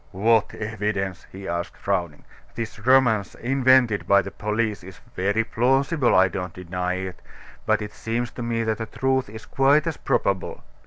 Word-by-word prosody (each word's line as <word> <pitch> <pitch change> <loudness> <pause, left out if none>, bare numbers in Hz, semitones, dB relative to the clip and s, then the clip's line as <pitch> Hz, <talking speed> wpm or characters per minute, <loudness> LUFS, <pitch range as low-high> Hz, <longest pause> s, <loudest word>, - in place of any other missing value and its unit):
"What 110 +3 +2
evidence!" 105 -4 -3
he 95 0 -9
asked, 85 +1 -4
frowning. 90 -6 -2 0.3
"This 115 -2 -5
romance 120 -4 +3
invented 130 -3 +3
by 100 0 +5
the 100 - -7
police 105 -2 -2
is 95 0 -12 0.2
very 100 +4 +1
plausible, 135 +5 +2
I 95 +1 +6
don't 90 -2 -5
deny 90 0 -3
it; 95 -1 -6 0.5
but 110 0 +2
it 105 - -8
seems 115 +1 -3
to - - -8
me 115 -1 -1
that 110 0 -1
the 115 - -4
truth 130 +1 0
is 110 +1 -10
quite 140 +4 +3
as 165 -3 -2
probable. 95 -2 -1
110 Hz, 165 wpm, -24 LUFS, 95-120 Hz, 0.5 s, I